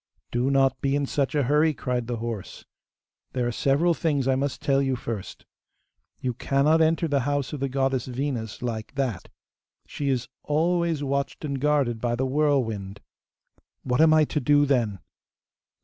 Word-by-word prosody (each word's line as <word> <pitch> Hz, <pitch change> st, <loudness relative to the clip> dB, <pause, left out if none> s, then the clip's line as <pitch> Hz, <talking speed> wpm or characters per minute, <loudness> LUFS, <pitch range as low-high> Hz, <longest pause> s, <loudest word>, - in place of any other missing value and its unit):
'Do 120 Hz, +2 st, +1 dB
not 135 Hz, -1 st, +2 dB
be 140 Hz, 0 st, +1 dB
in 145 Hz, -1 st, +1 dB
such 140 Hz, +1 st, -1 dB
a 145 Hz, -, +3 dB
hurry,' 150 Hz, +4 st, +3 dB
cried 125 Hz, -1 st, -2 dB
the 120 Hz, -, -2 dB
horse. 115 Hz, -3 st, -6 dB, 0.7 s
'There 125 Hz, -2 st, 0 dB
are 120 Hz, -, 0 dB
several 145 Hz, +8 st, +2 dB
things 145 Hz, -5 st, 0 dB
I 135 Hz, -, +4 dB
must 135 Hz, +1 st, -1 dB
tell 140 Hz, -2 st, +2 dB
you 135 Hz, -1 st, 0 dB
first. 115 Hz, -5 st, -6 dB, 0.7 s
You 125 Hz, -1 st, -2 dB
cannot 140 Hz, +6 st, +2 dB
enter 165 Hz, +1 st, +2 dB
the 145 Hz, -2 st, +1 dB
house 145 Hz, +1 st, -1 dB
of 150 Hz, -, -4 dB
the 135 Hz, 0 st, -1 dB
goddess 135 Hz, -1 st, 0 dB
Venus 125 Hz, -4 st, -4 dB
like 115 Hz, +1 st, -4 dB
that. 130 Hz, -8 st, -2 dB, 0.6 s
She 140 Hz, -1 st, -3 dB
is 130 Hz, -3 st, 0 dB
always 165 Hz, 0 st, +1 dB
watched 140 Hz, +2 st, -2 dB
and 140 Hz, -3 st, -3 dB
guarded 140 Hz, -6 st, +1 dB
by 120 Hz, -1 st, 0 dB
the 130 Hz, +2 st, -1 dB
whirlwind.' 125 Hz, -9 st, 0 dB, 0.8 s
'What 125 Hz, +3 st, +1 dB
am 160 Hz, 0 st, +6 dB
I 155 Hz, 0 st, +6 dB
to 150 Hz, -, -1 dB
do 145 Hz, +2 st, +4 dB
then? 120 Hz, -8 st, +1 dB
135 Hz, 170 wpm, -25 LUFS, 125-145 Hz, 0.8 s, am